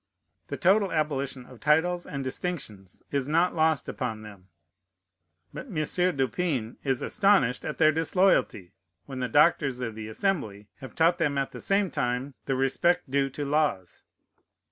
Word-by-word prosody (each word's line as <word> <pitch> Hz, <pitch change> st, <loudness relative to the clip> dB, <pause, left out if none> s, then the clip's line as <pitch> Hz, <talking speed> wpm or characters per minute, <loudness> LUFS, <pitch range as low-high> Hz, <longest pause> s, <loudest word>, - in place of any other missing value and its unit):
The -, -, -5 dB
total 195 Hz, +2 st, +3 dB
abolition 140 Hz, -5 st, -2 dB
of 125 Hz, -2 st, -15 dB
titles 175 Hz, +4 st, +1 dB
and 140 Hz, -2 st, -4 dB
distinctions 130 Hz, -, -5 dB
is 140 Hz, -2 st, -1 dB
not 165 Hz, +4 st, +2 dB
lost 160 Hz, -3 st, +1 dB
upon 115 Hz, -4 st, -4 dB
them. 100 Hz, -3 st, -13 dB, 1.1 s
But 260 Hz, -, -7 dB
M. 205 Hz, -, -9 dB, 0.4 s
du 135 Hz, -1 st, +1 dB
Pin 130 Hz, -7 st, -3 dB
is 135 Hz, -3 st, -1 dB
astonished 195 Hz, -, +2 dB
at -, -, -4 dB
their 155 Hz, -1 st, +5 dB
disloyalty, 165 Hz, -, +1 dB, 0.3 s
when 135 Hz, -2 st, -7 dB
the 125 Hz, -1 st, -2 dB
doctors 145 Hz, -2 st, +3 dB
of 115 Hz, -3 st, -4 dB
the 110 Hz, 0 st, -7 dB
Assembly 110 Hz, -, -2 dB
have 130 Hz, -2 st, -10 dB
taught 170 Hz, +2 st, +3 dB
them 145 Hz, -4 st, 0 dB
at 135 Hz, -1 st, -1 dB
the -, -, -9 dB
same 195 Hz, -2 st, +1 dB
time 125 Hz, +3 st, -2 dB
the 135 Hz, -, 0 dB
respect 135 Hz, +4 st, +1 dB
due 140 Hz, 0 st, +1 dB
to 145 Hz, +2 st, -5 dB
laws. 140 Hz, -, -1 dB
140 Hz, 160 wpm, -27 LUFS, 125-165 Hz, 1.1 s, their